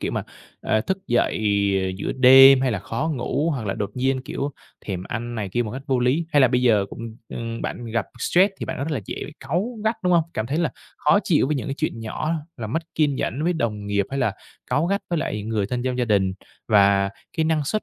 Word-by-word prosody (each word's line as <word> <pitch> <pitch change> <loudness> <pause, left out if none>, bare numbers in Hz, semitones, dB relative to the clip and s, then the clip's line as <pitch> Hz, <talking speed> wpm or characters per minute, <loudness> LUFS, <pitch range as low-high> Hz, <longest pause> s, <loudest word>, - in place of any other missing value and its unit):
Kiểu - - -2
mà, - - -1 0.4
ờ, 110 - +1
thức 190 - -2
dậy 120 -2 +1 0.6
giữa - - -2
đêm 135 +1 +8
hay 130 - +1
là 100 - -1
khó 135 - -3
ngủ 140 +5 -1
hoặc 125 -8 -3
là 95 - -1
đột 100 - -3
nhiên, 130 +1 0
kiểu, 140 +2 -3 0.4
thèm 95 -3 -3
ăn 120 0 -4
này 105 -4 -3
kia 120 +6 0
một 110 - -5
cách 130 - -6
vô 130 -3 +1
lý. 130 +7 +1
Hay 145 - +5
là 130 - +6
bây 125 +1 +1
giờ 105 -5 +4
cũng, 115 0 -8
ừm, 115 0 -5
bạn 120 - -4
gặp 115 -3 -2
stress 190 +9 +3
thì - - -4
bạn - - -4
rất 140 +4 -2
là 150 - -1
dễ - - -6 0.2
cáu 180 - -2
gắt, 220 +1 +1
đúng 180 -1 +2
hông? 170 -2 +4
Cảm 110 - -2
thấy 140 +6 -1
là 165 -5 +1 0.3
khó 150 +7 +4
chịu 155 -6 +3
với 150 +1 0
những 125 - -4
cái 135 - -2
chuyện 155 -7 -2
nhỏ, 115 +8 -3 0.2
là 110 - -5
mất 160 +10 -2
kiên 150 -3 +2
nhẫn 135 +3 -2
với 175 - +2
đồng 105 -9 -2
nghiệp 100 -1 0
hay 135 - -2
là 125 -6 +1 0.4
cáu 155 +4 +2
gắt 200 +2 0
với 170 - +1
lại 105 -9 -2
người 105 -2 -1
thân 125 +2 -2
trong 125 0 -2
gia 125 - +2
đình 100 -4 +2 0.4
và 100 -2 +4 0.3
cái 160 - +2
năng 155 -2 +1
suất, 215 +9 -1
125 Hz, 250 wpm, -23 LUFS, 110-150 Hz, 0.6 s, đêm